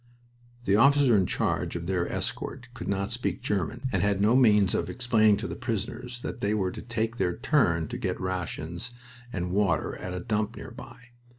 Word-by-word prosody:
The 100 - +4
officer 140 0 +6
in 95 -3 +3
charge - - -1
of 85 0 -4
their 90 -1 -1
escort 125 -1 -4
could 120 - -7
not 100 +1 -1
speak 120 +1 -2
German 105 +5 -1
and 95 - +1
had 100 0 +2
no 105 +4 +4
means 105 -7 +5
of - - -1
explaining 110 -4 +3
to - - -4
the - - -5
prisoners 120 +1 -4
that 120 - -5
they 105 +1 +1
were 95 -3 0
to - - -7
take 115 0 -2
their 90 -4 0
turn 85 - +2
to 120 0 -5
get 95 -7 -2
rations 90 +2 -4 0.4
and 90 -3 -3
water 95 -5 +1
at 90 0 -5
a - - -3
dump 110 +1 -1
nearby. 125 0 -11
105 Hz, 190 wpm, -28 LUFS, 95-120 Hz, 0.4 s, officer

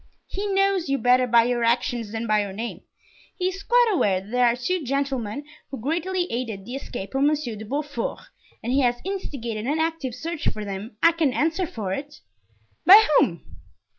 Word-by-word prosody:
"He 405 +1 -4
knows 390 -4 +2
you 275 - +2
better 250 0 +3
by 235 -1 +5
your 240 0 0
actions 235 -1 0
than 225 +1 -3
your 210 -2 +1
name; 230 +4 -5 0.6
he 365 -1 +1
is 380 +1 -7
quite 485 +3 +4
aware 195 - +2
that 195 +3 -13
there 250 0 +4
are 235 - +2
two 330 +8 -2
gentlemen 275 -2 -2 0.3
who 270 - -6
greatly 345 +8 -1
aided 225 -5 -4
the 245 - -7
escape 245 -7 -6
of 270 - 0
Monsieur 290 -5 +1
de 215 +1 -8
Beaufort, 285 0 -3 0.4
and 240 +3 -1
he 275 - +3
has 245 -2 +2
instigated 245 - -4
an 295 +3 +1
active 320 -6 -2
search 320 +4 -4
for 215 -1 -2
them, 205 +3 -6
I 335 - +8
can 325 -5 +1
answer 330 +6 0
for 205 -9 -4
it." 285 +6 -7 0.6
"By 420 +4 +9
whom?" 170 -2 0
255 Hz, 190 wpm, -24 LUFS, 230-325 Hz, 0.6 s, By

